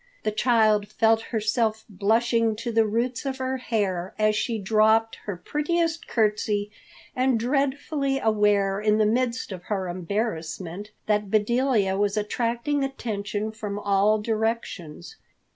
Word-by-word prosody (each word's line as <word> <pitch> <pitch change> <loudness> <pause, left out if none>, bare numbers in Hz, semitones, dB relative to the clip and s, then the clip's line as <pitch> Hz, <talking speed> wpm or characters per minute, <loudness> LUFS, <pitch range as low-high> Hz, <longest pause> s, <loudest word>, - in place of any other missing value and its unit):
The 215 - 0
child 215 -2 +3
felt 225 +1 +2
herself 220 0 0
blushing 225 +3 +1
to 230 +2 -4
the 225 -1 +3
roots 235 +3 -1
of 270 -1 -3
her 260 0 -2
hair 195 -7 -2
as 215 0 +2
she 230 +2 -1
dropped 220 +2 +3
her 200 -4 -4
prettiest 325 - -1
curtsy, 210 -2 0 0.4
and 255 -2 +2
dreadfully 275 +2 0
aware 205 -4 +2
in 210 0 +3
the 215 - +3
midst 235 +1 0
of 180 -2 -8
her 195 -3 -2
embarrassment 185 0 -4 0.2
that 210 -1 0
Bedelia 215 -2 +2
was 205 +1 +1
attracting 235 +6 -1
attention 215 -5 -3
from 210 -2 -5
all 205 +1 +2
directions. 220 - -3
220 Hz, 130 wpm, -25 LUFS, 205-240 Hz, 0.4 s, child